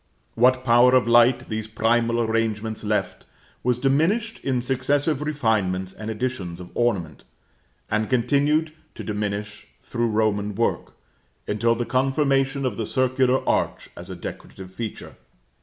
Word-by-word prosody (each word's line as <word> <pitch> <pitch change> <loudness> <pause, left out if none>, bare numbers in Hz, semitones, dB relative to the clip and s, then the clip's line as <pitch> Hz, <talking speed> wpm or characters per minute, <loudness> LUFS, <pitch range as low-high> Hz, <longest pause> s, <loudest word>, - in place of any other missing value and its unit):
What 130 +2 +3
power 125 +1 +5
of 130 - +4
light 120 +1 +4
these 110 -1 -4
primal 115 +1 +1
arrangements 110 -1 -1
left, 105 -2 -2 0.3
was 125 -1 +1
diminished 165 - +1
in 125 -3 0
successive 140 +3 0
refinements 110 -11 0
and 110 0 -7
additions 110 -7 -4
of 90 -1 -10
ornament; 95 - -1 0.6
and 110 0 -1
continued 145 +5 +2 0.2
to - - -7
diminish 105 0 -4 0.2
through 120 0 -1
Roman 105 -2 0
work, 115 +3 -1 0.5
until 115 +3 +1
the 120 +1 -2
confirmation 135 +2 +1
of 120 -6 -2
the 110 -2 -3
circular 130 0 +1
arch - - -1
as 85 +2 -9
a 95 - -6
decorative 95 +1 -9
feature. 110 +1 -7
120 Hz, 135 wpm, -23 LUFS, 105-130 Hz, 0.6 s, power